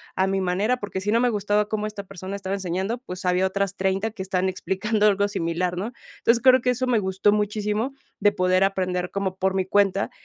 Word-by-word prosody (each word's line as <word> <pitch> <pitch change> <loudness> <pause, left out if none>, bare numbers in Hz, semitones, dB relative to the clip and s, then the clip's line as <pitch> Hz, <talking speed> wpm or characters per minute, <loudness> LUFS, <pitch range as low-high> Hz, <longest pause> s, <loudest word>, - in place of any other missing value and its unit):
a 190 0 +2
mi 195 0 0
manera", 200 +7 +1
porque 200 -4 -5
si 210 +2 -1
no 230 - +3
me 250 - +3
gustaba 210 0 +1
cómo 215 -1 -1
esta 210 -1 -7
persona 190 +1 -7
estaba 195 -1 -4
enseñando, 190 +5 -2
pues, 185 -6 -8
había 180 +1 +2
otras 195 0 -2
30 195 +3 0
que 205 -3 -8
estaban 190 0 0
explicando 210 +3 0
algo 200 0 +3
similar, 180 -2 -2
¿no?, 210 +6 -3 0.3
entonces, 230 0 +3
creo 255 -1 +6
que 250 +1 +2
eso 255 +1 -1
me 240 -3 +3
gustó 190 +1 +2
muchísimo, 210 +4 -1 0.3
de 205 0 +3
poder 185 -1 +2
aprender 180 -2 -1
como 190 -1 -2
por 190 0 0
mi 190 -1 +1
cuenta, 200 0 +2
195 Hz, 215 wpm, -24 LUFS, 190-210 Hz, 0.3 s, creo